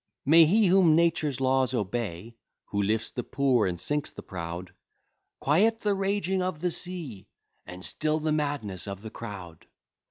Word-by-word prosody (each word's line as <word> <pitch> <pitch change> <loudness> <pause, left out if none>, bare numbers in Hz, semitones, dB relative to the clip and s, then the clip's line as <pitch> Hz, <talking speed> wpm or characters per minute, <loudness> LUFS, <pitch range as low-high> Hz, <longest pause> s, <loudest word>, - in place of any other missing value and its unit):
May 160 +3 +7
he, 210 +7 +4
whom 180 -4 +5
Nature's 155 -5 +1
laws 130 -1 +2
obey, 110 -1 -3 0.3
Who 100 - -1
lifts 110 +3 0
the 125 - -4
poor, 130 -7 +2
and 90 -2 -3
sinks 145 +6 -1
the - - -11
proud, 90 0 -6 0.7
"Quiet 215 +11 +2
the 205 -1 +1
raging 195 -1 0
of 180 -4 -2
the 180 +2 -1
sea, 160 - -5 0.4
And 90 +1 -6
still 155 0 0
the 155 0 -1
madness 140 - -2
of 100 +1 -6
the 110 - -7
crowd!" 95 -9 -9
135 Hz, 160 wpm, -27 LUFS, 100-170 Hz, 0.7 s, May